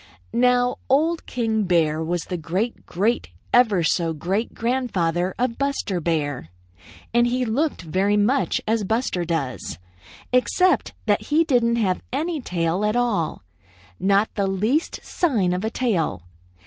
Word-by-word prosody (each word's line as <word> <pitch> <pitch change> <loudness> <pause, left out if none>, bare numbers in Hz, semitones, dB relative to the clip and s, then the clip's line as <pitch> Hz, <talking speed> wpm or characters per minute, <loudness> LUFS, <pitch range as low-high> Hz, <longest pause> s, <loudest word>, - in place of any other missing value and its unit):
"Now 245 +1 +3
Old 320 +5 +2
King 220 -3 0
Bear 160 -3 +2
was 170 +1 -2
the 180 - -4
great 185 +8 -3
great 210 +7 0 0.2
ever 215 -8 +4
so 165 0 +1
great 190 +9 -2
grandfather 190 -8 0
of 245 -1 -1
Buster 275 -9 -1
Bear, 145 - -2 0.6
and 240 0 +4
he 250 +1 0
looked 265 - -1
very 190 +5 +1
much 245 +7 +2
as 220 0 +1
Buster 210 -4 -1
does, 155 -7 -3 0.6
except 365 +9 +2
that - - +1
he 310 +3 +3
didn't 240 -6 +2
have 195 -6 0
any 310 +3 -2
tail 175 -2 -1
at 210 +1 +1
all, 230 - 0 0.6
not 200 +2 +2
the 200 -2 0
least 215 - 0
sign 220 - +1
of 180 +2 -2
a 220 - 0
tail. 205 - -1
215 Hz, 140 wpm, -23 LUFS, 175-245 Hz, 0.6 s, ever